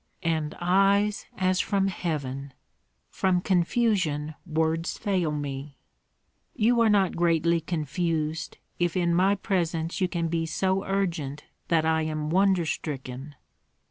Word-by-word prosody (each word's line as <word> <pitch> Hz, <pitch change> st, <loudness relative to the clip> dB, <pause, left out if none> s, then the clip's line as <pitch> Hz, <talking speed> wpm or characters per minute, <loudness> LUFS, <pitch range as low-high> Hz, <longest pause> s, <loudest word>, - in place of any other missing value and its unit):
"And 160 Hz, -2 st, -1 dB
eyes 195 Hz, +3 st, +2 dB
as 185 Hz, 0 st, +1 dB
from 195 Hz, -1 st, +1 dB
heaven! 140 Hz, -7 st, -4 dB, 0.6 s
From 185 Hz, -2 st, +1 dB
confusion, 175 Hz, -5 st, +1 dB
words 160 Hz, +1 st, 0 dB
fail 185 Hz, -6 st, 0 dB
me." 140 Hz, -1 st, -5 dB, 0.8 s
"You 235 Hz, +2 st, +3 dB
are 225 Hz, -, +5 dB
not 200 Hz, -3 st, +3 dB
greatly 170 Hz, 0 st, +2 dB
confused, 160 Hz, 0 st, -2 dB, 0.2 s
if 175 Hz, 0 st, +1 dB
in 170 Hz, -1 st, +2 dB
my 190 Hz, +3 st, +4 dB
presence 170 Hz, -3 st, -1 dB
you 185 Hz, -, +3 dB
can 170 Hz, -2 st, -2 dB
be 165 Hz, 0 st, -1 dB
so 190 Hz, +4 st, 0 dB
urgent 165 Hz, -7 st, -2 dB, 0.2 s
that 160 Hz, -2 st, +2 dB
I 160 Hz, 0 st, +2 dB
am 155 Hz, -1 st, -2 dB
wonder 190 Hz, -1 st, +3 dB
stricken." 140 Hz, -2 st, -5 dB
170 Hz, 125 wpm, -27 LUFS, 155-190 Hz, 0.8 s, are